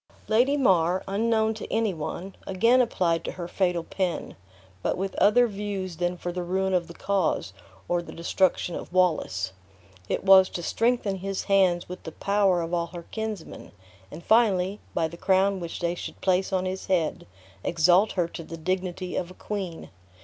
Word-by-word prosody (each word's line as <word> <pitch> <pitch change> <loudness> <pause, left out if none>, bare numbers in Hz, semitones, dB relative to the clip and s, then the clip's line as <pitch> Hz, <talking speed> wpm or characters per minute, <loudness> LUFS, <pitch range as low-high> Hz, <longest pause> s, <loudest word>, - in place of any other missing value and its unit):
Lady 250 +6 +3
Mar, 185 - +3
unknown 220 +2 +1
to 220 - -8
any 225 -3 +1
one, 175 +4 -6
again 230 +7 +4
applied 175 -8 +1
to - - -4
her 175 -2 -6
fatal 180 -2 0
pen; 180 -2 -3 0.5
but - - -1
with 190 +1 -3
other 245 +4 +5
views 200 -5 -4
than 175 +1 -1
for 175 - -4
the 180 +1 -3
ruin 190 +2 -1
of 175 -2 +1
the 170 - -10
cause, 180 - 0 0.3
or 175 0 +1
the 170 - -10
destruction 175 +1 0
of - - -6
Wallace. 155 - +1 0.6
It - - -1
was 190 -1 +7
to 175 - -5
strengthen 225 -1 +1
his 195 +1 -3
hands 185 -3 +3
with 180 +1 -8
the 160 - -8
power 200 -3 +2
of 165 +1 -5
all 170 -1 0
her 170 0 -9
kinsmen; 220 -6 -6 0.4
and 165 +9 -10
finally, 205 -3 +3 0.2
by 160 - +2
the 170 +1 -10
crown 190 +1 +2
which 170 -2 -6
they 170 0 0
should 175 - -7
place 190 0 +1
on 185 -1 0
his 185 +1 -4
head, 170 - 0 0.4
exalt 175 +5 +3
her 175 -3 +1
to 170 - -7
the 165 +1 -8
dignity 185 +1 -3
of 180 - -2
a 185 - -12
queen. 190 -5 -5
185 Hz, 180 wpm, -26 LUFS, 175-200 Hz, 0.6 s, was